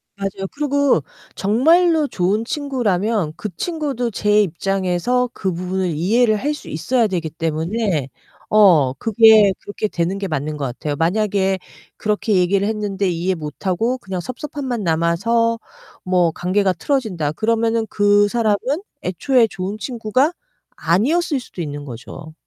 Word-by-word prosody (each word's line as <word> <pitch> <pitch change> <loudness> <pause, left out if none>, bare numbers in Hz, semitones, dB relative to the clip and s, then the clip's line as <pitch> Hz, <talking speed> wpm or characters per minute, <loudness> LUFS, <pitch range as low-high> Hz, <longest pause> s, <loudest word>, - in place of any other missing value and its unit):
맞아요. 195 -1 -4
그리고 285 - +1 0.3
정말로 315 - +3
좋은 205 +2 0
친구라면 220 - -1
그 210 - -5
친구도 280 - -2
제 210 0 +3
입장에서 195 +7 0
그 190 -2 -2
부분을 185 +1 -2
이해를 215 +9 +2
할 295 +6 -1
수 295 - -10
있어야 230 +9 +1
되기 175 -5 -2
때문에 165 - -1 0.4
어 175 -11 +5
그게 220 - +5
그렇게 205 +1 -3
되는 175 +1 -2
게 195 - -3
맞는 155 -2 -3
것 140 - -3
같아요. 145 +4 -4
만약에 195 +3 +1 0.4
그렇게 210 0 0
얘기를 195 +2 +2
했는데 205 -3 -1
이해 175 +2 -1
못하고 185 - -2
그냥 190 -6 -5
섭섭함만 255 - -5
남아서 195 +8 +1 0.5
뭐 180 -2 +2
관계가 185 +3 +1
틀어진다 180 - -1
그러면은 225 +3 0
그 205 0 +3
사람은 215 -1 +1 0.5
애초에 230 - +2
좋은 195 +1 -5
친구가 250 - 0 0.4
아니었을 280 - +1
수도 220 -7 -9
있는 145 -1 -6
거죠. 130 +5 -9
205 Hz, 310 characters per minute, -20 LUFS, 175-230 Hz, 0.5 s, 어